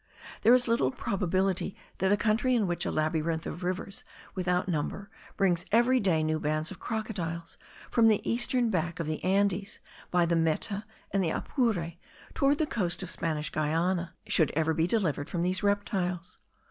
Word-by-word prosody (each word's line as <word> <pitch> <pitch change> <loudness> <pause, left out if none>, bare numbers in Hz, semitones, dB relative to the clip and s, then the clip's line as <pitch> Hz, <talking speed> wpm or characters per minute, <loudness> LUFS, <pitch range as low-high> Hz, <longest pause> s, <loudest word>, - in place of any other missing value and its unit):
There 235 +3 +7
is 250 0 +2
little 230 +2 +2
probability 190 -5 -1 0.2
that 190 +1 +2
a 205 - +4
country 230 +4 +2
in 220 -4 +2
which 175 -2 -1
a - - -1
labyrinth 160 +1 0
of 175 - -6
rivers 185 +2 -3 0.3
without 180 -1 0
number 185 +5 -3 0.3
brings 175 -3 +2
every 240 +4 +4
day 175 -7 +2
new 155 0 0
bands 155 +2 -1
of 190 - -9
crocodiles 175 -7 -4 0.3
from 230 -1 +5
the 215 -2 +2
eastern 240 0 +2
back 170 -2 -1
of 165 - -1
the 155 0 -4
Andes, 195 +1 +1 0.3
by 175 -1 +3
the 170 0 +1
Meta 165 +6 0 0.3
and 195 -1 +1
the 165 - +1
Apure, 185 - -1 0.4
toward 280 +1 +3
the 315 - +1
coast 190 -9 -1
of 180 - -3
Spanish 155 -2 -2
Guiana, 170 +3 0
should 160 - +3
ever 160 0 +2
be 165 +1 +1
delivered 175 -8 0
from 170 -1 -1
these 185 +1 +1
reptiles. 190 -4 -1
185 Hz, 170 wpm, -29 LUFS, 165-210 Hz, 0.4 s, There